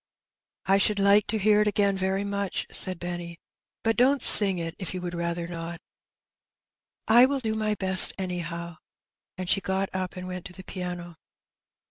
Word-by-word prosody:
" - - -67
I - - +4
ahoald 205 +1 +1
like 200 +1 +2
to 220 - -2
hear 210 0 +2
it 210 - 0
again 200 -1 0
rery 190 +1 -2
much," 200 -1 -4
Eaid 185 -1 +2
Benny; 175 -1 -7 0.2
" - - -67
bat 225 0 -1
don't 265 +3 +2
sing 195 -3 +6
it 165 -1 -5
if 185 0 -6
yon 180 - -7
would 175 0 -6
rather 170 0 -4
not." 170 0 -8 0.7
" - - -63
I 255 - +6
will 280 +1 -2
do 220 -4 -4
my 215 -1 -2
beet, 190 -2 +7
anyhow; 170 -2 -6 0.3
" - - -67
and 185 -1 -6
she 195 - +1
got 190 0 -3
up 185 0 -5
and 185 0 -8
went 180 -1 -8
to 180 - -11
the 190 - -13
piano. 175 -2 -8
185 Hz, 195 wpm, -25 LUFS, 175-200 Hz, 0.7 s, beet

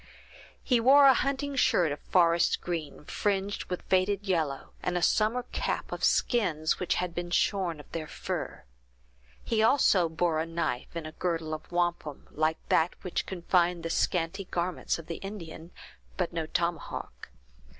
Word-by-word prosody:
He 250 -3 +3
wore 275 +4 +7
a 270 - +9
hunting 275 +2 -1
shirt 175 - +3
of 145 - -4
forest 170 -2 +3
green, 160 -4 -5
fringed 200 +2 -1
with 180 - -5
faded 195 +2 +1
yellow, 155 -7 -1
and 180 - -1
a - - -1
summer 220 +6 +2
cap - - -2
of - - -5
skins 165 - +2
which 180 - 0
had 180 -1 -2
been 175 0 -4
shorn 175 -2 +1
of 150 - -14
their 160 -2 -4
fur. - - -5 0.8
He 220 -1 +1
also 215 - +4
bore 160 0 0
a 160 - -2
knife 165 -5 -3
in 165 -2 -4
a 155 - -6
girdle 165 -2 -2
of 155 +2 -7
wampum, 175 -4 -2
like 155 +1 0
that 165 +2 +3
which 180 - -2
confined 175 -1 +1
the 165 - -3
scanty 180 +4 0
garments 180 0 -2
of 165 - -10
the 165 0 -5
Indian, 170 -5 -8 0.5
but 180 -2 -1
no 165 -2 -2
tomahawk. 170 - -3
175 Hz, 160 wpm, -29 LUFS, 165-195 Hz, 0.8 s, a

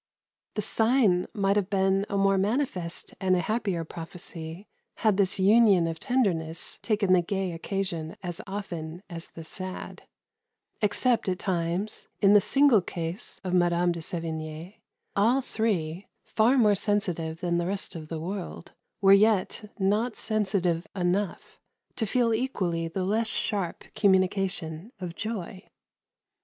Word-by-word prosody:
The 210 - -1
sign 220 -5 +3
might 200 -2 +1
have 200 -2 0
been 195 0 +2
a 200 - -1
more 195 0 +3
manifest 195 -5 -1
and 185 -1 +3
a - - +2
happier 195 -3 -1
prophecy 165 +2 -8 0.3
had 215 -3 +2
this 195 -1 +2
union 200 -2 +5
of 165 -1 -3
tenderness 170 -10 0
taken 205 -4 +2
the 180 - +5
gay 190 +1 -2
occasion 170 -2 -3
as 175 -2 -3
often 175 -4 -6
as 165 -1 -6
the 165 - -10
sad. 185 +3 -6 0.7
Except 220 +1 +2
at 180 - 0
times, 180 +2 -2
in 200 -1 +5
the 205 - +7
single 270 -2 +5
case 170 +4 -5
of 185 -1 -3
Mme. 175 0 +3
de 170 -1 -4
Sevigne, 160 +2 -5 0.4
all 230 +7 +4
three 195 -8 -2 0.2
far 235 +5 +3
more 215 -4 +5
sensitive 180 -6 0
than 175 -1 +1
the 175 - -1
rest 195 -1 -2
of 155 -2 -7
the 160 0 -4
world 180 0 -6 0.3
were 195 0 +7
yet 210 +1 +3
not 210 +4 +1
sensitive 195 -5 0
enough 185 +2 -2 0.4
to 220 - -1
feel 235 +1 +2
equally 185 -9 -1
the 185 +3 -3
less 220 +4 +1
sharp 200 -5 -2
communication 190 -2 +1
of 180 -2 -5
joy. 195 -2 -5
190 Hz, 140 wpm, -27 LUFS, 170-210 Hz, 0.7 s, the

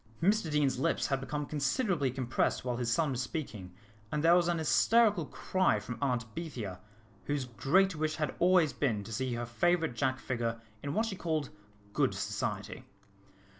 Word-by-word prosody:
Mr 200 -1 +2
Deane's 145 -4 +1
lips - - +1
had 135 -1 0
become 145 +2 -3
considerably 150 - 0
compressed 130 0 -1
while 125 -1 -1
his 120 -1 -1
son 150 +4 +2
was 125 -1 -1
speaking, 120 - -5 0.4
and 150 0 -1
there 165 +1 +6
was 175 -1 +4
an 175 -1 +1
hysterical 185 - +3
cry 185 - +1
from 115 +3 -7
Aunt 125 -5 0
Bethia, 120 - -5 0.5
whose 145 -2 -1
great 170 +10 +2
wish 155 0 -1
had 150 -3 -2
always 175 -5 +4
been 120 -6 0
to 110 - -8
see 130 +2 -1
her 120 0 -3
favourite 165 +5 +1
Jack 130 +3 0
figure 115 -3 -2 0.2
in 145 0 -4
what 220 - +2
she 215 -4 -3
called 160 -6 -2 0.4
good - - +1
society. - - -3
145 Hz, 170 wpm, -31 LUFS, 125-170 Hz, 0.5 s, there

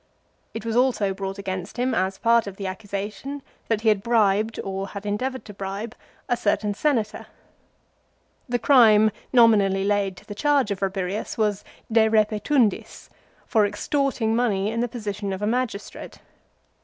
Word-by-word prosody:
It 225 - -5
was 225 -1 -2
also 240 -6 +2
brought 195 0 -5
against 190 +1 -5
him 250 +1 0
as 190 -2 0
part 230 -2 +3
of 195 - -6
the 200 - -5
accusation 205 +8 -5 0.2
that 220 -2 0
he 225 - +3
had 210 -2 +2
bribed, 220 -1 +2
or 195 0 -4
had 200 +1 -8
endeavoured 255 +6 -3
to 210 - -10
bribe, 200 +3 -5 0.3
a 245 - +2
certain 210 -2 0
Senator. 225 -3 -1 1.2
The 245 - +1
crime 220 -5 +5 0.2
nominally 205 -6 +4
laid 200 -2 0
to - - -15
the 205 - -7
charge 275 0 +1
of 200 - -3
Rabirius 195 +1 -3
was 210 -2 0 0.3
"De 220 0 +4
repetundis," 215 +2 +1 0.4
for 220 -3 +2
extorting 225 +2 0
money 210 -4 +1
in 230 - -3
the 240 - +1
position 210 -4 -4
of 190 - -6
a - - +2
magistrate. 235 -2 -3
210 Hz, 155 wpm, -24 LUFS, 200-235 Hz, 1.2 s, crime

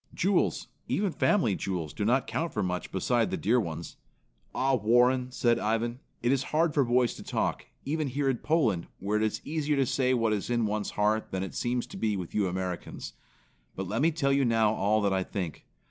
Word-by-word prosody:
"Jewels, 185 -6 +1 0.2
even 200 -1 0
family 160 - +2
jewels, 90 -5 -3
do 105 - -3
not 125 +4 +2
count 165 +1 -2
for 105 - -1
much 90 -1 -3
beside 115 +5 +1
the - - -2
dear 120 +5 +2
ones. 85 -5 -5 0.6
Ah, 135 +1 +2
Warren," 125 +2 +3
said 120 -2 +1
Ivan, 115 +3 -1 0.2
"it 120 - +3
is 135 -1 +1
hard 160 0 +2
for 140 - +3
boys 120 -1 +2
to - - -10
talk, - - -2 0.2
even 155 +1 -1
here 140 +2 -1
in 130 -2 +2
Poland, 115 - +1
where 100 +3 -1
it 110 - +1
is 110 - -1
easier 150 -1 0
to 135 -1 +2
say 130 0 +1
what 115 -2 +1
is 105 +1 -2
in 120 -2 +1
one's 105 0 -1
heart 105 +1 +1
than 95 0 -2
it 95 - -6
seems 120 0 -1
to 195 - -10
be 110 - 0
with 90 -3 -6
you 105 -2 +1
Americans. 90 -1 -4 0.6
But 95 0 -4
let 110 +6 -1
me 160 - +5
tell 145 -4 +1
you 140 0 +3
now 115 -3 +3
all 110 0 +1
that 100 -1 +2
I 95 - +1
think. 90 -4 -5
115 Hz, 215 wpm, -28 LUFS, 100-135 Hz, 0.6 s, me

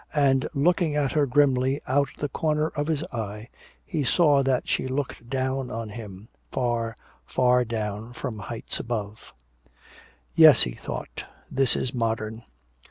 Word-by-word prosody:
And 135 -2 +3
looking 160 +1 +2
at 145 -3 +1
her 150 -2 +2
grimly 135 0 +3
out 140 +1 +2
of - - -21
the 145 - +1
corner 155 +2 0
of 145 0 -3
his 155 -2 0
eye, 110 0 -5 0.4
he 160 -6 -2
saw 145 0 +4
that 130 -2 0
she - - 0
looked 130 -3 -4
down 130 0 -1
on 115 -1 -4
him, 105 -2 -9 0.2
far, 120 -2 -1 0.3
far 125 0 +3
down 110 0 -4
from 120 -4 -5
heights 115 +2 -5
above. 110 -2 -5 1.0
"Yes," 155 -6 +8
he 60 - -2
thought, - - -6 0.3
"this 135 -1 +2
is 125 - -2
modern." 110 -2 -2
130 Hz, 150 wpm, -26 LUFS, 115-145 Hz, 1.0 s, Yes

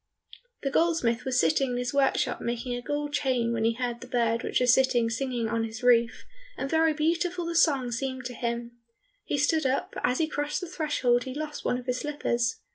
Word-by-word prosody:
The 275 - -1
goldsmith 320 -8 +1
was 260 -1 +1
sitting 275 -4 +2
in - - -1
his 245 +1 -2
workshop 270 -2 +1
making 240 +1 -3
a 245 - -3
gold 290 +2 -3
chain, 255 -5 +1
when 225 -1 -1
he 230 - +3
heard 240 0 -3
the 255 - -9
bird 230 -2 +1
which - - 0
was 250 -1 +5
sitting 245 -3 +3
singing 245 -1 -2
on 230 0 -1
his 225 +2 -6
roof, 235 -2 +3 0.3
and 270 - -2
very 320 +2 +3
beautiful 340 +3 0
the 340 - -3
song 275 -7 +3
seemed 260 +2 -3
to 250 - -4
him. 235 0 -3 0.5
He - - -1
stood 290 +1 +2
up, 260 +1 -1
but - - -6
as 250 +1 +2
he 320 - +2
crossed 290 +3 -2
the 360 - -5
threshold 290 -8 0
he 260 0 -6
lost 300 0 -5
one 245 - 0
of 250 - -8
his 250 0 -1
slippers. 240 -5 -1
255 Hz, 215 wpm, -27 LUFS, 240-295 Hz, 0.5 s, was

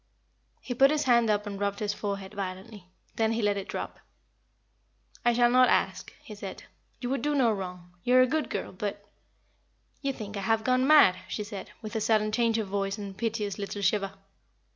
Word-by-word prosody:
He 250 - -4
put 270 +3 +5
his 305 0 +1
hand 235 -3 +4
up 210 0 +1
and 200 -1 -5
rubbed 200 0 -1
his 205 0 -1
forehead 200 -2 -4
violently. 190 0 -6 0.3
Then 225 0 +2
he 225 -1 -1
let 205 -1 +2
it 200 -1 -5
drop. - - -5 1.2
"I 240 - +4
shall 240 0 +4
not 255 0 +6
ask," - - 0
he 215 - -9
said. 200 -2 -8 0.4
"You 245 0 -3
would 270 -3 0
do 295 +3 0
no 250 -5 +4
wrong. 180 -3 -6
You 250 - +3
are 255 - +8
a - - +6
good 305 +4 -1
girl; - - -3
but 205 +1 -5 0.5
" - - -42
"You 275 -2 0
think 210 -5 -7
I - - -3
have 220 +2 +1
gone 255 +2 +2
mad," 285 -12 +7
she 210 - -3
said, 205 -2 -7
with 215 +1 -6
a 220 - 0
sudden 215 -1 +2
change 230 0 +2
of 220 -3 -2
voice 195 +1 -2
and 200 -1 -6
a - - -12
piteous 210 -1 -3
little 200 0 -4
shiver. 195 0 +1
215 Hz, 210 wpm, -28 LUFS, 200-240 Hz, 1.2 s, are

